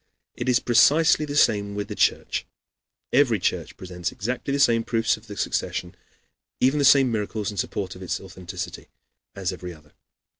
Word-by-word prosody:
It - - -3
is 125 -1 +4
precisely 150 +6 +4
the 145 - -4
same 100 -7 +2
with 105 0 -3
the - - -5
Church. - - 0 0.7
Every 125 -4 +4
church 90 - -2
presents 90 -1 -5
exactly 125 +6 -4
the 140 - 0
same 115 -4 +4
proofs 115 -1 +1
of 110 +1 -17
the 105 -1 -9
succession, 90 - -2
and 90 - -23 0.6
even 135 +4 +3
the 140 - +3
same 135 -2 +6
miracles, 105 -1 -2
in 100 - -10
support 95 +1 -3
of 90 - -12
its 90 - -3
authenticity, 90 -1 -8 0.5
as 95 -2 -2
every 90 -1 -8
other. 75 -1 -21
105 Hz, 180 wpm, -24 LUFS, 95-125 Hz, 0.7 s, same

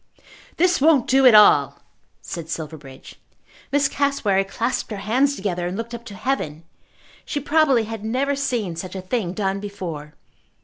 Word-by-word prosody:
"This 355 -3 +2
won't 295 -4 +4
do 265 0 +5
at 235 - +7
all," 210 0 +6 0.5
said 165 -2 -7
Silverbridge. 150 -5 -8 0.5
Miss 285 +1 +3
Cassewary 255 -9 +1
clasped 225 +6 -3
her 210 - -5
hands 255 +8 +1
together 180 -5 -3
and 180 +2 -4
looked 230 +1 -6
up 235 0 -8
to 205 - -9
heaven. 180 - -3 0.6
She 290 - -3
probably 290 -4 +3
had 220 -1 -7
never 265 +6 0
seen 240 -10 -2
such 185 +3 -7
a 190 - -4
thing 185 -3 -2
done 195 -1 -1
before. 170 -7 -7
215 Hz, 160 wpm, -22 LUFS, 185-270 Hz, 0.6 s, at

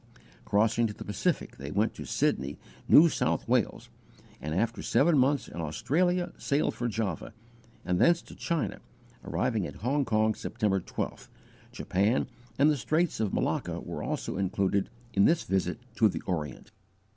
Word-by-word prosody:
_ - - -24 0.3
Crossing 115 +3 +2
to 105 - -7
the - - -8
Pacific, 105 -2 -1
they 70 +1 -6
went 105 +8 +1
to - - -8
Sydney, 70 +3 0 0.3
New 165 - +9
South - - 0
Wales, - - 0 0.5
and, 75 +1 -3
after 115 +5 0
seven 160 +3 +3
months 140 +1 +2
in 85 - -6
Australia, 175 - 0
sailed 140 +1 +1
for 120 - -2
Java, 110 -2 -3 0.5
and 90 -1 +1
thence 170 0 +4
to - - -13
China, 165 -4 -2 0.4
arriving 110 -8 -1
at - - -10
Hong 140 +3 +2
Kong, 110 -2 +2
September 100 -2 -1
12th; 85 - -5 0.4
Japan 100 +7 +1 0.3
and 145 +3 +5
the 150 - 0
Straits 155 +8 0
of 110 -3 0
Malacca - - -1
were - - -6
also - - -3
included 95 +1 0 0.2
in 100 - +4
this 165 0 +3
visit 95 -1 0 0.2
to 110 - +5
the - - -4
Orient. 75 -7 -4
110 Hz, 160 wpm, -29 LUFS, 95-140 Hz, 0.5 s, New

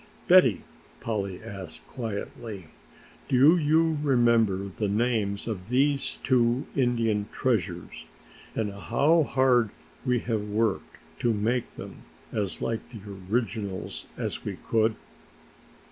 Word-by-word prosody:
"Betty," 130 - +6 0.4
Polly 100 -4 -3
asked 100 -7 -9
quietly, 110 - -6 0.6
"do 135 +6 +6
you 160 -1 +2
remember 115 -8 +3
the 105 - -1
names 105 -1 0
of 100 -3 -5
these 140 +2 +1
two 120 0 +2
Indian 115 -5 +1
treasures 90 -9 -2 0.5
and 105 -3 -1
how 145 +11 +3
hard 130 -5 +3 0.3
we 125 -2 +2
have 115 -2 -1
worked 105 -1 -1 0.2
to 115 -2 +2
make 115 +4 -1
them - - -8 0.3
as 100 -3 -2
like 115 -1 -3
the 115 -4 -10 0.3
originals 110 -5 -2
as - - -3
we - - -4
could?" 110 0 +2
115 Hz, 115 wpm, -27 LUFS, 105-125 Hz, 0.6 s, Betty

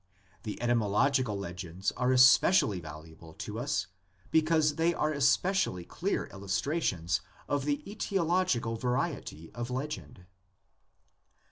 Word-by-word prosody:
The 105 - -6
etymological 120 +1 +2
legends 90 0 -4
are 125 0 0
especially 130 - +5
valuable 80 0 -11
to 105 +1 -6
us 125 -8 -1 0.5
because 155 -1 +3
they 165 +1 +2
are 155 - 0
especially 140 - +1
clear - - -2
illustrations 95 - -1 0.3
of 145 -1 -1
the 145 -1 -1
£Etiological 180 - 0
variety 125 - -2
of 120 0 -5
legend. 130 -8 -5
125 Hz, 105 wpm, -30 LUFS, 95-150 Hz, 0.5 s, especially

